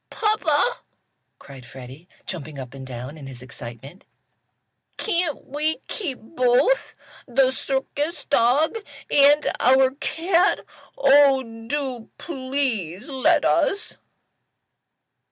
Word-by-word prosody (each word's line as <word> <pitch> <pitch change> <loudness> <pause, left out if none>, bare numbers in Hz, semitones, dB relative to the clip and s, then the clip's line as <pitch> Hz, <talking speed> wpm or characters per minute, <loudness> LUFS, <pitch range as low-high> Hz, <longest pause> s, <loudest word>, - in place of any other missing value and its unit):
"Papa!" 425 -2 +1 0.6
cried 135 -2 -13
Freddie, 130 +7 -12 0.2
jumping 155 -4 -6
up 130 -2 -8
and 135 -1 -9
down 130 +4 -8
in 140 - -9
his 130 -2 -10
excitement, 130 - -10 0.9
"can't 345 - -1
we 300 +3 -1
keep 315 - -3
both 255 - +1 0.3
the 260 +1 +3
circus 275 +5 -3
dog 285 - +2 0.3
and 290 +1 +5
our 260 +1 +4
cat? 340 +6 +1 0.4
Oh, 280 - +5
do 235 +1 -5
please, 260 - -3
let 265 -1 +2
us." 405 +2 +1
265 Hz, 100 wpm, -23 LUFS, -, 0.9 s, and